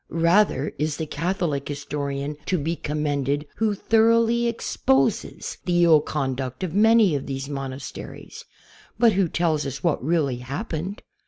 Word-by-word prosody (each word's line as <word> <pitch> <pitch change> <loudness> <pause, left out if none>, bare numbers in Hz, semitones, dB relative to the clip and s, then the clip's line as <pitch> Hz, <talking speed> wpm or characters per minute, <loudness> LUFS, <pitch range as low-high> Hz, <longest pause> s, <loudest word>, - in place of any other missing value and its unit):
Rather 170 -3 +2
is 150 -1 -1
the 160 - -3
Catholic 165 -4 -2
historian 145 0 -4
to 185 - +1
be 160 +2 -2
commended 145 -2 -1
who 215 -1 +1
thoroughly 230 +2 +3
exposes 135 - 0
the 175 -1 +3
ill 160 -3 +6
conduct 130 -2 -3
of 175 -4 -3
many 220 -2 +5
of 140 -2 -3
these 135 0 -4
mon 135 -2 -4
asteries, 135 +1 -9 0.5
but 235 -2 +5
who 190 -1 +2
tells 160 -3 +1
us 135 0 -5
what 170 -7 +1
really 145 -4 +1
happened. 155 - -5
155 Hz, 145 wpm, -24 LUFS, 140-185 Hz, 0.5 s, ill